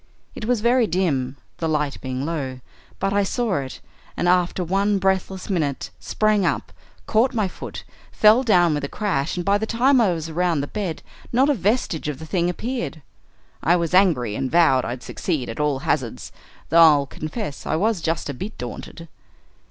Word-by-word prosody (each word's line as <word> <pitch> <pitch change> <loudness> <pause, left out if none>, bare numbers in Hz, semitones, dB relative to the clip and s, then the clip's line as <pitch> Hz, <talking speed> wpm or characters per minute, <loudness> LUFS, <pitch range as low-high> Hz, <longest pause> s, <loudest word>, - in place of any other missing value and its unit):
It - - -6
was 240 -2 +1
very 240 0 +3
dim, 140 -8 0 0.2
the 165 - -2
light 150 -2 -1
being 130 +1 -3
low, 140 -6 -3 0.4
but 195 +1 -1
I 205 - +3
saw 215 0 0
it, 130 -1 -7 0.4
and 175 - 0
after 180 0 +2
one 195 +4 +1
breathless 190 0 -1
minute 155 -8 -2
sprang 215 -2 +1
up, - - -1 0.3
caught 235 +4 +2
my 215 -4 +1
foot, - - -8 0.3
fell 215 +3 +5
down 180 -9 +4
with 145 -1 -2
a - - -1
crash, 180 -7 -1
and 175 - -3
by 200 +1 +3
the 220 - -2
time 250 +3 +3
I 205 -5 +3
was 165 -2 -3
around 165 -1 0
the - - -2
bed, 185 -1 -4 0.3
not 265 +5 +4
a - - +3
vestige 205 - 0
of 150 -3 -3
the 160 - -9
thing 175 +1 0
appeared. 230 - -4 0.6
I 170 - +4
was 170 -1 -1
angry, 155 - +3
and 135 +1 -2
vowed 155 -6 +4
I'd 120 +1 -5
succeed 155 -9 -3
at 115 - -6
all 150 -2 +1
hazards, 125 -6 -2 0.4
though 170 +1 +6
I'll 150 -4 +6
confess 155 - -6
I - - +1
was 205 +2 +1
just 165 0 -1
a 145 - -3
bit 195 +11 -7
daunted. 145 +7 -8
175 Hz, 190 wpm, -22 LUFS, 150-205 Hz, 0.6 s, though